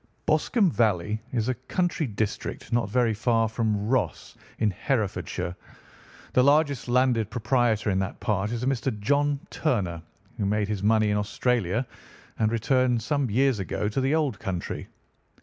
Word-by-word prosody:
"Boscombe 205 -8 +2
Valley 105 -2 +1
is 115 -2 0
a 130 - +2
country 155 +5 -1
district 110 +2 -4
not 115 -4 +1
very 120 0 +2
far 115 +1 +2
from 110 -2 -1
Ross, 130 +1 -1 0.2
in 110 -2 +2
Herefordshire. 95 -5 -2 0.8
The 125 - +5
largest 145 -2 +3
landed 120 -3 +2
proprietor 120 -3 +1
in 95 - +1
that 95 0 -3
part 105 0 -1
is 120 0 -3
a - - 0
Mr. 130 -4 -1
John 145 +6 +1
Turner, 95 - -1 0.4
who 100 - +1
made 105 0 +1
his 105 -3 -2
money 110 0 +3
in 105 - +1
Australia 110 +1 0 0.5
and 110 -1 +2
returned 125 +1 +2
some 140 -1 0
years 130 +1 +2
ago 95 +2 -2
to 120 +5 -1
the 135 +4 +2
old 145 -9 0
country. 90 -3 -4
115 Hz, 155 wpm, -26 LUFS, 105-130 Hz, 0.8 s, The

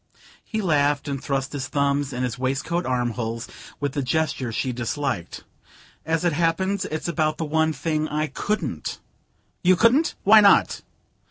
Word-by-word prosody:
He 220 -1 -3
laughed 145 -3 +2
and 140 -1 -4
thrust 135 -1 -2
his 135 -2 -3
thumbs 140 -1 0
in 125 0 -3
his 125 -1 -3
waistcoat 140 +6 -1
armholes 120 -2 -2 0.3
with 145 -1 -1
the 140 - -2
gesture 135 -3 -1
she 125 +4 -1
disliked. 120 - -3 0.6
"As 165 +1 0
it 170 - +2
happens, 185 +5 0
it's 155 +2 -4
about 155 -2 0
the 160 - -2
one 160 +1 +1
thing 155 +1 -1
I 155 +1 -1
couldn't." 155 - -3 0.6
"You 185 +1 +5
couldn't? 235 - +3
Why 215 +2 +8
not?" 200 -1 +4
145 Hz, 155 wpm, -24 LUFS, 130-165 Hz, 0.6 s, Why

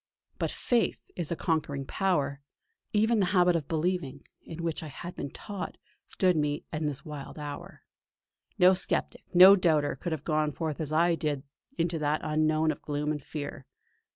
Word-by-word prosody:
But - - 0
Faith 240 -2 -1
is 175 -3 -1
a - - +1
conquering 150 -5 -1
power; 145 -6 0 0.5
even 220 +1 +3
the 190 - +2
habit 180 -1 +5
of 155 -4 -2
believing, 160 -4 -2 0.2
in 165 +1 -8
which 165 -2 -2
I 160 - -6
had 175 +5 -8
been - - -4
taught, 195 +6 -6 0.3
stood 185 -1 +2
to 160 - 0
me 150 0 -1
in 155 -1 -1
this 140 -2 -4
wild 150 -2 -8
hour. 145 -1 -7 0.7
No 180 +1 +7
sceptic, 185 - -1
no 185 +2 +10
doubter, 160 -6 +2
could 175 - -5
have 155 -3 -3
gone 155 -2 0
forth 160 -2 -3
as 155 -1 -3
I 170 +2 +3
did 150 -4 -2 0.3
into 165 -1 0
that 150 0 0
unknown 155 +1 +2
of - - -7
gloom 150 0 -2
and 150 -1 -3
fear. 145 -2 -7
155 Hz, 180 wpm, -29 LUFS, 150-175 Hz, 0.7 s, no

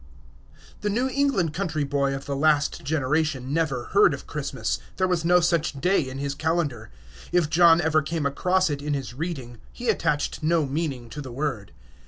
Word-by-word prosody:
The 210 - -1
New 245 +6 0
England 260 - +1
country 160 -4 -2
boy 140 -1 0
of 135 - -7
the 140 - -3
last 150 +2 +2
generation 145 -2 0
never 150 -6 0
heard 420 +1 +5
of - - -12
Christmas. - - -3 0.2
There 185 - +2
was 180 -3 0
no 180 +1 +5
such 165 -4 0
day 180 +7 +3
in 130 - -7
his 140 0 -2
calendar. 150 -7 -1 0.4
If 170 -3 +2
John 170 0 +6
ever 160 -2 +2
came 155 0 -3
across 180 +5 +1
it 140 -1 -3
in 145 0 -1
his 130 -4 -5
reading, 130 -6 -5
he 245 -1 -4
attached 165 -8 0
no 160 0 +2
meaning 135 -4 -3
to 150 - -6
the 130 -3 -8
word. 120 -6 -3
155 Hz, 185 wpm, -25 LUFS, 140-170 Hz, 0.4 s, John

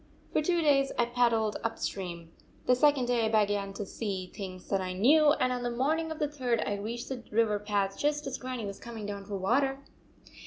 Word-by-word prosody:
" - - -29
For - - +3
two 345 +2 +1
days 275 -2 +4
I 240 - +3
paddled 235 -3 +2
up 225 0 -2
stream. 170 -4 -5 0.3
The 250 - +5
second 285 -1 +4
day 240 -2 +2
I - - 0
began 205 -2 +1
to 205 - -5
see 190 -3 -4
things 185 -2 -7
that 195 -1 +1
I 185 0 -3
knew, 290 +10 +5
and 255 -4 +1
on 250 - -3
the 245 - -1
morning 300 +7 0
of 315 - -4
the 300 - 0
third 255 -5 -1
I 205 - -1
reached 230 +4 -5
the 255 -3 -5
river 210 -1 +2
path 200 -1 -1
just 295 0 0
as 270 -1 -4
Grannie 255 -3 -4
was 200 -1 -6
coming 230 -3 -7
down 200 -1 -5
for 200 0 -4
water." 270 +8 +1
235 Hz, 225 wpm, -30 LUFS, 200-270 Hz, 0.3 s, The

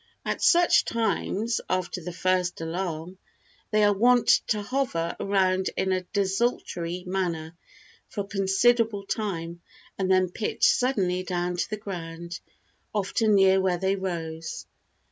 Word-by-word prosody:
At - - -2
such 350 0 +5
times, 230 -1 -1
after 185 0 -1
the 180 +2 -6
first 180 0 0
alarm, 170 +1 -4 0.5
they 215 -1 +3
are 205 0 +5
wont 245 +4 +3 0.2
to 210 -2 0
hover 205 -9 -1
around 190 -1 +1
in 190 - 0
a 185 0 +1
desultory 190 -4 -1
manner 175 -3 -2 0.5
for 205 - -3
a 200 - -7
considerable 205 +2 +2
time 170 -6 -3 0.4
and 190 -1 0
then 185 -1 +3
pitch 215 - 0
suddenly 235 - +2
down 180 -1 -2
to - - -1
the 215 - -3
ground, 170 -4 -7 0.5
often 210 +1 +1
near 190 -1 +5
where 185 -2 +1
they 190 +2 +1
rose. 165 -4 -5
190 Hz, 135 wpm, -26 LUFS, 175-210 Hz, 0.5 s, such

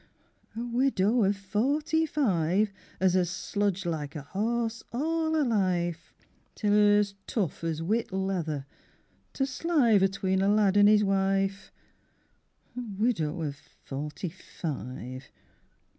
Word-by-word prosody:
A 230 - -3
widow 240 -3 +2
of 200 +1 +2
forty 285 +11 0
five 200 - +1 0.3
As 185 -1 +3
has 180 -2 +2
sludged 195 0 -1
like 155 -4 -3
a 150 - -5
horse 230 +7 -2
all 320 +5 0
her 310 - +3
life, 180 - 0 0.4
Till 205 -2 +1
'er's 205 -1 +4
tough 190 - -2
as 165 -1 -2
whit 220 +6 0
leather, 180 -7 -2 0.7
to 270 - -1
slive 265 - +2
Atween 190 0 +1
a 195 - +2
lad 205 -2 +3
an' 205 0 +7
'is 210 0 +5
wife! 195 0 0 1.0
A 250 - -3 0.2
widow 175 -8 0
of 145 -2 -3 0.3
forty 150 +6 -4
five. 130 -7 -7
195 Hz, 125 wpm, -28 LUFS, 175-230 Hz, 1.0 s, an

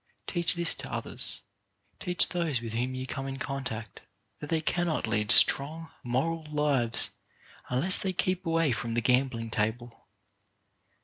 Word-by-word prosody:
Teach 175 0 +4
this 170 -1 +2
to - - -9
others. - - 0 0.6
Teach 180 -1 +3
those 165 -7 -1
with 115 -1 -7
whom 125 +3 -2
you 130 0 -5
come 135 +1 -5
in 135 0 -5
contact 125 -6 -6 0.4
that 150 - -8
they 165 - +1
cannot 170 0 -1
lead 105 -1 -1
strong, 155 +3 +5
moral 150 +7 -1
lives 145 -6 0 0.6
unless 145 +10 +3
they 190 - -2
keep 185 +1 -2
away 165 -4 +1
from 115 -1 -3
the 120 - +1
gambling 125 -2 0
table. 115 +3 -3
135 Hz, 145 wpm, -28 LUFS, 120-165 Hz, 0.6 s, strong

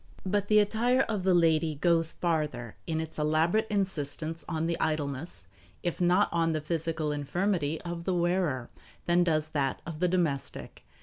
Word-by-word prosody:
But 205 +1 0
the 215 - +4
attire 230 +5 +3
of 215 -6 -1
the 185 0 +3
lady 160 -2 +3
goes 165 +1 +3
farther 150 -9 -2
in 160 -1 -1
its 160 -1 -5
elaborate 160 +8 +2
insistence 165 -5 -1
on 160 -1 -1
the 170 0 -1
idleness, 145 - -2 0.4
if 175 0 -2
not 180 +3 +4
on 165 -1 +1
the 155 - 0
physical 160 -1 -2
infirmity 160 +1 -1
of 170 -1 -5
the 185 - 0
wearer, 175 -8 0 0.3
than 175 +1 +4
does 155 -2 +1
that 135 -4 -1
of 165 -2 -6
the 180 - +3
domestic. 170 -6 -2
165 Hz, 165 wpm, -29 LUFS, 155-180 Hz, 0.4 s, the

